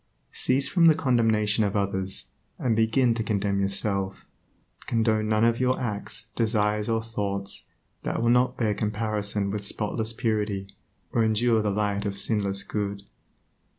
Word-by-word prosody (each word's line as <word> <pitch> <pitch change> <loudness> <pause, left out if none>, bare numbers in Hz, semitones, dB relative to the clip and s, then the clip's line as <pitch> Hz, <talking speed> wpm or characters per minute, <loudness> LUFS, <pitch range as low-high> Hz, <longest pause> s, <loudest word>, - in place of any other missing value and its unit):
Cease 135 +2 +1
from 170 +2 +4
the 160 - +7
condemnation 110 -6 +2
of 100 0 -1
others, 95 -1 -1 0.3
and 115 -3 +1
begin 115 +2 +3
to 115 - -2
condemn 100 -2 0
yourself. 100 0 -1 0.6
Condone 110 -2 +1
none 110 +1 +3
of 115 0 +2
your 130 0 +1
acts, 105 -1 -3
desires 105 -2 +1
or 115 0 +1
thoughts 100 -3 -3 0.3
that - - -2
will 115 +1 +3
not 125 +1 +3
bear 110 -3 +1
comparison 105 -1 -1
with 105 0 -3
spotless 110 +2 -2
purity, 105 -4 -1 0.4
or 115 - +2
endure 110 +1 +3
the 105 - 0
light 100 0 0
of 100 0 -4
sinless 100 -2 0
good. 100 -1 -3
105 Hz, 150 wpm, -26 LUFS, 100-115 Hz, 0.6 s, the